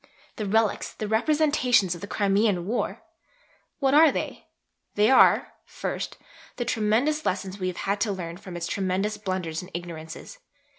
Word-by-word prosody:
The 215 Hz, -, -3 dB
'relics,' 220 Hz, +1 st, +1 dB
the 215 Hz, -, -5 dB
'representations' 250 Hz, -, +2 dB
of 175 Hz, -, -9 dB
the 200 Hz, -, -6 dB
Crimean 200 Hz, -3 st, +1 dB
War! 230 Hz, +5 st, -2 dB, 0.7 s
What 270 Hz, -2 st, +1 dB
are 310 Hz, 0 st, +7 dB
they? -, -, -5 dB, 0.5 s
They 210 Hz, +4 st, +4 dB
are, 265 Hz, -, +5 dB
first, -, -, -5 dB, 0.4 s
the 240 Hz, -, -3 dB
tremendous 240 Hz, +7 st, +1 dB
lessons 190 Hz, -2 st, -2 dB
we 185 Hz, -, -1 dB
have 180 Hz, -, -4 dB
had 200 Hz, +1 st, 0 dB
to 215 Hz, -, +1 dB
learn 175 Hz, -3 st, -5 dB
from 180 Hz, -2 st, -8 dB
its 170 Hz, -, -3 dB
tremendous 195 Hz, +3 st, -1 dB
blunders 185 Hz, -5 st, -3 dB
and 180 Hz, -, -11 dB
ignorances. 170 Hz, -, -8 dB
205 Hz, 155 wpm, -26 LUFS, 185-235 Hz, 0.7 s, are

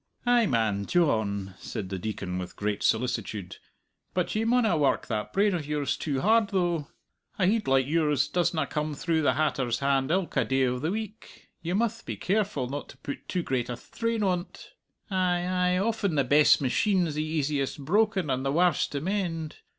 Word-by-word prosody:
"Ay 245 Hz, -2 st, +4 dB
man, 110 Hz, -, +1 dB
Dyohn," 105 Hz, -, +1 dB
said 105 Hz, -5 st, -5 dB
the 95 Hz, -1 st, -4 dB
Deacon 95 Hz, -2 st, -4 dB
with 90 Hz, -1 st, -7 dB
great 105 Hz, 0 st, -2 dB
solicitude; 110 Hz, -5 st, -1 dB, 0.6 s
"but 180 Hz, -2 st, 0 dB
you 220 Hz, +1 st, 0 dB
maunna 235 Hz, -5 st, +3 dB
work 145 Hz, -3 st, +1 dB
that 110 Hz, -2 st, -3 dB
brain 200 Hz, 0 st, +2 dB
o' 175 Hz, -, 0 dB
yours 145 Hz, -2 st, -1 dB
too 140 Hz, -3 st, -2 dB
hard, 220 Hz, +1 st, +4 dB
though. 175 Hz, -6 st, 0 dB, 0.5 s
A 190 Hz, -, +2 dB
heid 215 Hz, +3 st, +1 dB
like 135 Hz, -1 st, +3 dB
yours 150 Hz, -2 st, +2 dB
doesna 175 Hz, -2 st, 0 dB
come 150 Hz, -1 st, -2 dB
through 160 Hz, +2 st, 0 dB
the 145 Hz, -, +3 dB
hatter's 135 Hz, -6 st, 0 dB
hand 135 Hz, -1 st, +1 dB
ilka 180 Hz, +1 st, +1 dB
day 135 Hz, 0 st, +1 dB
o' 125 Hz, 0 st, -1 dB
the 155 Hz, +5 st, -1 dB
week; 215 Hz, +2 st, -7 dB
you 175 Hz, +2 st, -2 dB
mutht 225 Hz, +1 st, 0 dB
be -, -, -5 dB
careful 205 Hz, -8 st, 0 dB
not 145 Hz, +3 st, -5 dB
to -, -, -13 dB
put 140 Hz, -, -7 dB
too 180 Hz, -2 st, -1 dB
great 125 Hz, -5 st, -1 dB
a -, -, -2 dB
thtrain 230 Hz, -, -3 dB
on't. 180 Hz, -2 st, -3 dB, 0.4 s
Ay, 180 Hz, -2 st, +1 dB
ay; 180 Hz, 0 st, +1 dB
often 200 Hz, -3 st, 0 dB
the 140 Hz, -, +3 dB
best 145 Hz, +4 st, +5 dB
machine's 175 Hz, -, +1 dB
the 150 Hz, +1 st, -1 dB
easiest 145 Hz, -3 st, -2 dB
broken 200 Hz, -2 st, +2 dB
and 130 Hz, +1 st, -1 dB
the 135 Hz, -, 0 dB
warst 175 Hz, 0 st, +2 dB
to 140 Hz, -, -2 dB
mend. 170 Hz, -4 st, -2 dB
155 Hz, 185 wpm, -27 LUFS, 130-190 Hz, 0.6 s, best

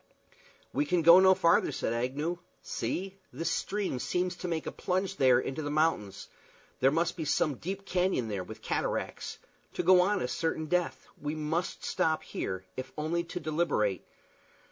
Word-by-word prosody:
"We 145 Hz, +2 st, +1 dB
can 175 Hz, 0 st, +2 dB
go 170 Hz, +3 st, +9 dB
no 190 Hz, 0 st, +6 dB
farther," 170 Hz, -2 st, +3 dB
said 115 Hz, -, -2 dB
Agnew. 140 Hz, +9 st, -2 dB, 0.2 s
"See 195 Hz, +1 st, -3 dB
this 165 Hz, 0 st, -2 dB
stream 195 Hz, -7 st, -1 dB
seems 180 Hz, +6 st, -1 dB
to -, -, -5 dB
make 165 Hz, -2 st, -2 dB
a -, -, -3 dB
plunge 185 Hz, +1 st, -2 dB
there 130 Hz, -3 st, +5 dB
into 135 Hz, +4 st, -3 dB
the 145 Hz, -, -3 dB
mountains. 150 Hz, -10 st, 0 dB, 0.5 s
There 130 Hz, -, +5 dB
must 165 Hz, +4 st, 0 dB
be 165 Hz, -, -4 dB
some 150 Hz, 0 st, +1 dB
deep 195 Hz, +3 st, -5 dB
canyon 180 Hz, -10 st, +1 dB
there 100 Hz, -4 st, -3 dB
with 110 Hz, +3 st, -11 dB
cataracts. -, -, -2 dB, 0.4 s
To -, -, -2 dB
go 185 Hz, +1 st, +7 dB
on 200 Hz, +2 st, +2 dB
is 125 Hz, -, -2 dB
certain 160 Hz, -1 st, -1 dB
death. 175 Hz, +2 st, -1 dB, 0.2 s
We 150 Hz, +1 st, -2 dB
must 160 Hz, +3 st, -2 dB
stop 160 Hz, -4 st, +1 dB
here, 95 Hz, 0 st, -4 dB
if 130 Hz, 0 st, -6 dB
only 165 Hz, +3 st, 0 dB
to 175 Hz, +1 st, -5 dB
deliberate. 150 Hz, -, 0 dB
160 Hz, 170 wpm, -30 LUFS, 135-180 Hz, 0.5 s, go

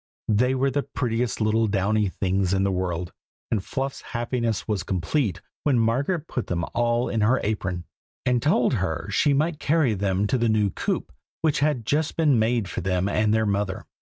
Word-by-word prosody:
They 125 Hz, +5 st, +3 dB
were 135 Hz, +1 st, +1 dB
the 145 Hz, +2 st, +1 dB
prettiest 120 Hz, -4 st, -2 dB
little 110 Hz, +1 st, +2 dB
downy 105 Hz, +1 st, +1 dB
things 95 Hz, 0 st, 0 dB
in 95 Hz, -, +1 dB
the 100 Hz, -, +1 dB
world, 90 Hz, -2 st, -2 dB, 0.4 s
and 105 Hz, -4 st, 0 dB
Fluff's 135 Hz, +3 st, -3 dB
happiness 120 Hz, -2 st, -2 dB
was 105 Hz, -4 st, 0 dB
complete 95 Hz, -, -1 dB, 0.2 s
when 140 Hz, -4 st, +2 dB
Margaret 140 Hz, +9 st, +1 dB
put 125 Hz, -, -3 dB
them 85 Hz, -1 st, -1 dB
all 120 Hz, +1 st, +1 dB
in 110 Hz, -, -1 dB
her 120 Hz, +5 st, +3 dB
apron, 90 Hz, -5 st, -2 dB, 0.4 s
and 125 Hz, -2 st, +2 dB
told 140 Hz, -3 st, +2 dB
her 95 Hz, -3 st, -2 dB
she 140 Hz, +9 st, +3 dB
might 155 Hz, +2 st, 0 dB
carry 150 Hz, -7 st, +2 dB
them 100 Hz, 0 st, 0 dB
to 125 Hz, +5 st, +1 dB
the 115 Hz, -1 st, +2 dB
new 105 Hz, -2 st, +2 dB
coop -, -, -2 dB, 0.3 s
which 155 Hz, -3 st, +2 dB
had 145 Hz, -6 st, +1 dB
just 150 Hz, +5 st, 0 dB
been 150 Hz, -7 st, +4 dB
made 115 Hz, -2 st, +1 dB
for -, -, -4 dB
them 90 Hz, +1 st, 0 dB
and 105 Hz, +1 st, +1 dB
their 110 Hz, 0 st, +2 dB
mother. 100 Hz, -2 st, -1 dB
110 Hz, 185 wpm, -25 LUFS, 95-130 Hz, 0.4 s, been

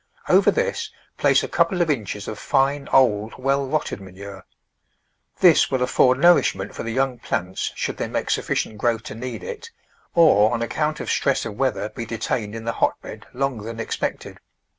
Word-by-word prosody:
Over -, -, +5 dB
this 470 Hz, -2 st, -1 dB, 0.3 s
place -, -, +3 dB
a -, -, -2 dB
couple 185 Hz, -4 st, +1 dB
of 170 Hz, -3 st, +2 dB
inches 105 Hz, -6 st, -4 dB
of 110 Hz, -, -6 dB
fine, 140 Hz, +1 st, 0 dB
old, 110 Hz, -4 st, +3 dB
well 135 Hz, +1 st, 0 dB
rotted 150 Hz, -7 st, -2 dB
ma 95 Hz, -, -11 dB
nure. 95 Hz, +1 st, -10 dB, 1.0 s
This 175 Hz, -4 st, +6 dB
will 130 Hz, -2 st, 0 dB
afford 125 Hz, 0 st, +3 dB
nourishment 135 Hz, -, +3 dB
for -, -, -6 dB
the 115 Hz, -, -4 dB
young 130 Hz, 0 st, 0 dB
plants 95 Hz, -2 st, -3 dB
should -, -, -3 dB
they -, -, -2 dB
make -, -, -2 dB
sufficient 105 Hz, -, -1 dB
growth 115 Hz, -1 st, 0 dB
to -, -, -7 dB
need 125 Hz, +3 st, -6 dB
it, 465 Hz, -1 st, -7 dB, 0.5 s
or 150 Hz, -11 st, +5 dB
on 115 Hz, -, -2 dB
account 150 Hz, +5 st, -2 dB
of -, -, -3 dB
stress 135 Hz, -, +1 dB
of 110 Hz, -3 st, -6 dB
weather 130 Hz, -4 st, -1 dB
be 115 Hz, 0 st, -7 dB
detained 110 Hz, -1 st, -3 dB
in 115 Hz, -, -6 dB
the 115 Hz, -, 0 dB
hotbed -, -, -2 dB
longer 130 Hz, -4 st, -2 dB
than 115 Hz, 0 st, -6 dB
expected. -, -, -4 dB
125 Hz, 185 wpm, -22 LUFS, 110-140 Hz, 1.0 s, This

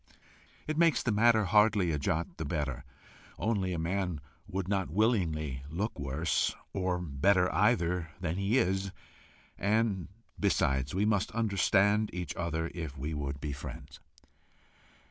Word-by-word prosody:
It 155 Hz, +1 st, -2 dB
makes 165 Hz, -2 st, +4 dB
the 120 Hz, -, +1 dB
matter 110 Hz, +1 st, +4 dB
hardly 105 Hz, -2 st, +4 dB
a 75 Hz, -, -1 dB
jot 80 Hz, +4 st, -2 dB
the -, -, -3 dB
better, 70 Hz, -2 st, -2 dB, 0.5 s
only 95 Hz, -2 st, 0 dB
a 90 Hz, -, -2 dB
man 90 Hz, 0 st, -1 dB, 0.3 s
would 95 Hz, -2 st, -3 dB
not 95 Hz, -2 st, 0 dB
willingly 80 Hz, -, 0 dB
look 100 Hz, +8 st, -3 dB
worse, 70 Hz, +4 st, 0 dB, 0.2 s
or 90 Hz, -2 st, 0 dB
better 90 Hz, +4 st, +2 dB
either, 90 Hz, -4 st, +2 dB
than 85 Hz, -2 st, -2 dB
he 100 Hz, +5 st, +1 dB
is, 95 Hz, -4 st, +1 dB, 0.7 s
and 105 Hz, -2 st, +1 dB, 0.3 s
besides, 70 Hz, -8 st, +1 dB
we 100 Hz, +2 st, +2 dB
must 105 Hz, -2 st, +1 dB
understand 105 Hz, -1 st, +2 dB
each 90 Hz, -1 st, -4 dB
other 85 Hz, -1 st, -2 dB
if 80 Hz, -5 st, -6 dB
we 75 Hz, +4 st, -3 dB
would 70 Hz, -2 st, -3 dB
be 70 Hz, 0 st, -4 dB
friends. 70 Hz, -, -9 dB
90 Hz, 140 wpm, -31 LUFS, 80-105 Hz, 0.7 s, makes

